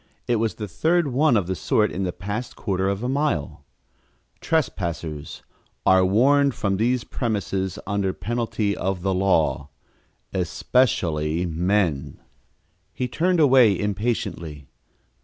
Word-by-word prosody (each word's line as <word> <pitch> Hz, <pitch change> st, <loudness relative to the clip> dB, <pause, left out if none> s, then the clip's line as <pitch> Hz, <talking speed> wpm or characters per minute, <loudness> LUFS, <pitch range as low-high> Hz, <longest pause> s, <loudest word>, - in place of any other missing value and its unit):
It 120 Hz, -, +2 dB
was 110 Hz, 0 st, -1 dB
the 105 Hz, -, -5 dB
third 160 Hz, -, +1 dB
one 135 Hz, -1 st, +3 dB
of 100 Hz, -, 0 dB
the 95 Hz, -, -2 dB
sort 105 Hz, +3 st, +1 dB
in 95 Hz, +1 st, -2 dB
the 90 Hz, -, -1 dB
past 105 Hz, +7 st, -5 dB
quarter 95 Hz, -2 st, -1 dB
of 100 Hz, +3 st, -2 dB
a -, -, -1 dB
mile: 135 Hz, -, -1 dB, 0.8 s
TRESPASSERS 85 Hz, -, -3 dB, 0.4 s
Are 95 Hz, 0 st, +5 dB
warned 135 Hz, +7 st, +3 dB
from 100 Hz, -6 st, -1 dB
these 120 Hz, +3 st, +1 dB
premises 100 Hz, -5 st, -2 dB
under 100 Hz, -1 st, 0 dB
penalty 110 Hz, +1 st, -2 dB
of 95 Hz, -2 st, -3 dB
the 95 Hz, -1 st, +1 dB
law 80 Hz, -6 st, +1 dB, 0.6 s
ESPECIALLY 85 Hz, -5 st, 0 dB
MEN 85 Hz, -3 st, 0 dB, 0.7 s
He 125 Hz, -, -3 dB
turned 175 Hz, +8 st, +1 dB
away 130 Hz, -8 st, +5 dB
impatiently. 100 Hz, -, -3 dB
100 Hz, 125 wpm, -23 LUFS, 90-120 Hz, 0.8 s, Are